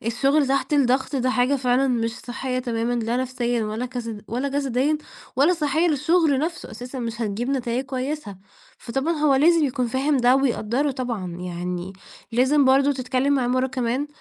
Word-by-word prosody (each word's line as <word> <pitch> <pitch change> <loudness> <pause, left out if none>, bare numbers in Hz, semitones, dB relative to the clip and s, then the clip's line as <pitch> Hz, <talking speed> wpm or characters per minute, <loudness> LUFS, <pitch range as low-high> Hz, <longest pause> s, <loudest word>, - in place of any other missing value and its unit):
الشغل 275 +5 +2
تحت 275 +3 0
الضغط 270 0 +2
ده 255 0 +1
حاجة 255 +3 +2
فعلًا 255 +1 +2
مش 230 -1 -1
صحيَّة 255 +1 -4
تمامًا، 235 -1 -1
لا 235 0 -1
نفسيًا 245 -2 -1
ولا 220 +4 -3
كسد 230 -4 -6
ولا 255 +5 -2
جسديًا، 280 +1 0 0.4
ولا 305 +7 +4
صحيَّة 315 +2 +1
للشغل 310 -1 +2
نفسه 330 +4 -3
أساسًا، 250 +2 -7
مش 230 -1 -4
هتجيب 220 +5 -2
نتايِج 255 -1 -1
كويِسة. 260 -5 -4 0.4
فطبعًا 270 +7 -2
هو 295 -3 +3
لازم 325 +3 +4
يكون 255 -3 -1
فاهم 270 +4 +1
ده 250 +1 +4
ويقدِّره، 270 +1 0
طبعًا. 230 -10 -4
يعني 180 +1 -4 0.4
لازم 265 +4 +3
برضه 275 +2 +4
تتكلَّم 255 +1 0
معاه 260 -3 +1
مرَّة 255 +1 +1
كمان، 255 +2 -2
255 Hz, 165 wpm, -23 LUFS, 240-280 Hz, 0.4 s, ولا